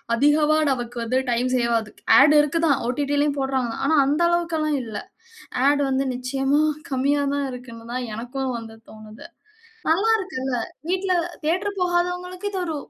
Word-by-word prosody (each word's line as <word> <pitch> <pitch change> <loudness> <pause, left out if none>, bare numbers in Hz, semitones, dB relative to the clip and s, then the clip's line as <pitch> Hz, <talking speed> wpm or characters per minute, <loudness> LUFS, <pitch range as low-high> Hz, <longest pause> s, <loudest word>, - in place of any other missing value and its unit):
அதிகமா 300 +4 +3
நமக்கு 240 -2 -4
வந்து 250 +3 +1
டைம் 240 +2 +1
சேவ் 235 -1 +1
ஆகுது, 215 -1 -10 0.3
ஆட் 290 +2 +6
இருக்குதா, 320 +2 +1 0.2
ஒடிடிலயும் 285 +2 0
போடுறாங்கதா, 265 -3 -1
ஆனா 315 - +3
அந்த 290 +4 +1
அளவுக்கல்லாம் 325 -4 0
இல்ல, 220 -3 -6 0.7
ஆட் 285 0 +3
வந்து 265 0 +1
நிச்சயமா 270 +3 0 0.3
கம்மியா 280 +2 +1
தான் 285 -1 -1
இருக்குனு 235 -2 -10
தான் 250 -1 -3
எனக்கும் 255 +3 -4
வந்து 225 -1 -9
தோணுது, 215 0 -12 0.6
நல்லா 370 +8 +3
இருக்குல்ல, 265 - -3 0.3
வீட்டில 375 +1 0 0.3
தியேட்டர் 375 +6 -1
போகாதவங்களுக்கு, 360 +2 -1
இது 390 - -4
ஒரு 320 -3 -3
280 Hz, 145 wpm, -23 LUFS, 250-325 Hz, 0.7 s, ஆட்